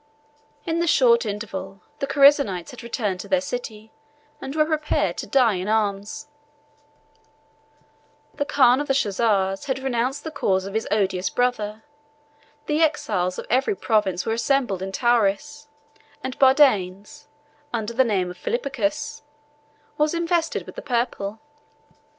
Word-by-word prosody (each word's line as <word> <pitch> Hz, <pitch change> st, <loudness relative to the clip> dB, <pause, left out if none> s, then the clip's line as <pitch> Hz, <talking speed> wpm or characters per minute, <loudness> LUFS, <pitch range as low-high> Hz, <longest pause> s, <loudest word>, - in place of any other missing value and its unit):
In 330 Hz, -1 st, -1 dB
the 340 Hz, -, 0 dB
short 240 Hz, -6 st, +4 dB
interval, 195 Hz, -2 st, -6 dB, 0.2 s
the 275 Hz, -, -2 dB
Chersonites 275 Hz, -, +4 dB
had 250 Hz, -, -10 dB
returned 215 Hz, -5 st, -3 dB
to -, -, -7 dB
their 280 Hz, -, +2 dB
city, 245 Hz, -6 st, -6 dB, 0.5 s
and 270 Hz, +2 st, -6 dB
were 305 Hz, -1 st, +3 dB
prepared 310 Hz, -1 st, 0 dB
to -, -, -5 dB
die 250 Hz, -5 st, +3 dB
in 185 Hz, +1 st, -3 dB
arms; 215 Hz, +6 st, -1 dB, 2.1 s
the -, -, -1 dB
khan 260 Hz, -2 st, +4 dB
of 295 Hz, -, -4 dB
the 270 Hz, -, +1 dB
Chozars 200 Hz, -4 st, +1 dB
had 265 Hz, -1 st, -1 dB
renounced 265 Hz, 0 st, -2 dB
the 320 Hz, -, -5 dB
cause 190 Hz, -10 st, 0 dB
of 195 Hz, -, -7 dB
his 220 Hz, +1 st, -2 dB
odious 195 Hz, -3 st, 0 dB
brother; 220 Hz, -4 st, -1 dB, 0.8 s
the 300 Hz, +1 st, 0 dB
exiles 185 Hz, -, 0 dB
of -, -, -6 dB
every 265 Hz, -, +1 dB
province 210 Hz, -, 0 dB
were 225 Hz, -, 0 dB
assembled 235 Hz, -4 st, 0 dB
in 190 Hz, 0 st, -4 dB
Tauris; 240 Hz, +7 st, 0 dB, 0.6 s
and 260 Hz, 0 st, -5 dB
Bardanes, 260 Hz, -4 st, +3 dB, 0.4 s
under 230 Hz, -1 st, -3 dB
the 260 Hz, +3 st, +4 dB
name 190 Hz, -6 st, 0 dB
of 180 Hz, -, -13 dB
Philippicus, 295 Hz, +3 st, -2 dB, 0.8 s
was 300 Hz, +2 st, +2 dB
invested 335 Hz, -1 st, 0 dB
with -, -, -10 dB
the -, -, -7 dB
purple. 235 Hz, -5 st, -2 dB
235 Hz, 140 wpm, -23 LUFS, 200-280 Hz, 2.1 s, short